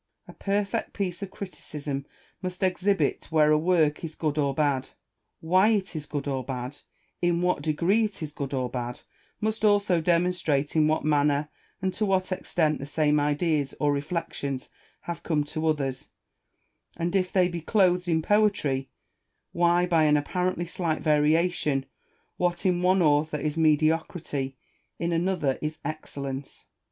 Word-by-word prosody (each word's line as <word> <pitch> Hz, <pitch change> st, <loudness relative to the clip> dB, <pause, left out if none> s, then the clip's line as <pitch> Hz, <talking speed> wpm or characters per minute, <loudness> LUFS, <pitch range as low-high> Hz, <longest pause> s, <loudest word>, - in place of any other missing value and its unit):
A -, -, -11 dB
perfect 200 Hz, 0 st, -1 dB
piece 185 Hz, -2 st, -3 dB
of 200 Hz, -, -4 dB
criticism 150 Hz, -8 st, -6 dB, 0.3 s
must 185 Hz, 0 st, -4 dB
exhibit 185 Hz, -4 st, +1 dB
where 155 Hz, -2 st, +4 dB
a 155 Hz, -, +5 dB
work 160 Hz, -3 st, +2 dB
is 160 Hz, -1 st, -5 dB
good 155 Hz, -1 st, -1 dB
or 140 Hz, -1 st, +2 dB
bad; 140 Hz, -3 st, +1 dB, 0.5 s
why 185 Hz, +5 st, +4 dB
it 200 Hz, -5 st, 0 dB
is 150 Hz, -1 st, -5 dB
good 145 Hz, -1 st, -4 dB
or 135 Hz, -2 st, -1 dB
bad; 125 Hz, +1 st, -5 dB, 0.4 s
in 175 Hz, 0 st, +2 dB
what 180 Hz, 0 st, +1 dB
degree 170 Hz, +8 st, +2 dB
it 200 Hz, -6 st, -6 dB
is 150 Hz, -, -5 dB
good 140 Hz, -2 st, -5 dB
or 130 Hz, -2 st, -1 dB
bad; 120 Hz, 0 st, -5 dB, 0.4 s
must 220 Hz, 0 st, -1 dB
also 205 Hz, -5 st, +3 dB
demonstrate 170 Hz, -4 st, +1 dB
in 155 Hz, -1 st, +4 dB
what 155 Hz, 0 st, 0 dB
manner, 145 Hz, 0 st, +2 dB, 0.3 s
and 190 Hz, -1 st, 0 dB
to 210 Hz, -, -2 dB
what 190 Hz, -2 st, +1 dB
extent 160 Hz, -4 st, 0 dB
the 140 Hz, -, -6 dB
same 150 Hz, 0 st, +2 dB
ideas 145 Hz, 0 st, 0 dB
or 145 Hz, -1 st, +2 dB
reflections 140 Hz, -3 st, -3 dB, 0.3 s
have 170 Hz, -1 st, -5 dB
come 150 Hz, -3 st, 0 dB
to 155 Hz, +2 st, -3 dB
others, 140 Hz, -4 st, -1 dB, 0.9 s
and, 170 Hz, +2 st, -1 dB
if 185 Hz, -1 st, +1 dB
they 185 Hz, -2 st, +4 dB
be 175 Hz, -1 st, -5 dB
clothed 180 Hz, -1 st, +2 dB
in 160 Hz, -2 st, +1 dB
poetry, 200 Hz, -11 st, +2 dB, 0.6 s
why 175 Hz, +1 st, +3 dB
by 165 Hz, -3 st, +3 dB
an 150 Hz, 0 st, +5 dB
apparently 180 Hz, +3 st, -1 dB
slight 165 Hz, -3 st, -2 dB
variation, 150 Hz, -2 st, +2 dB, 0.5 s
what 175 Hz, 0 st, 0 dB
in 180 Hz, -1 st, +2 dB
one 185 Hz, 0 st, +4 dB
author 150 Hz, 0 st, +2 dB
is 150 Hz, 0 st, -2 dB
mediocrity, 155 Hz, -3 st, +1 dB, 0.4 s
in 170 Hz, 0 st, -1 dB
another 165 Hz, -5 st, 0 dB
is 155 Hz, +1 st, -3 dB
excellence. 140 Hz, -3 st, -6 dB
160 Hz, 155 wpm, -27 LUFS, 145-180 Hz, 0.9 s, a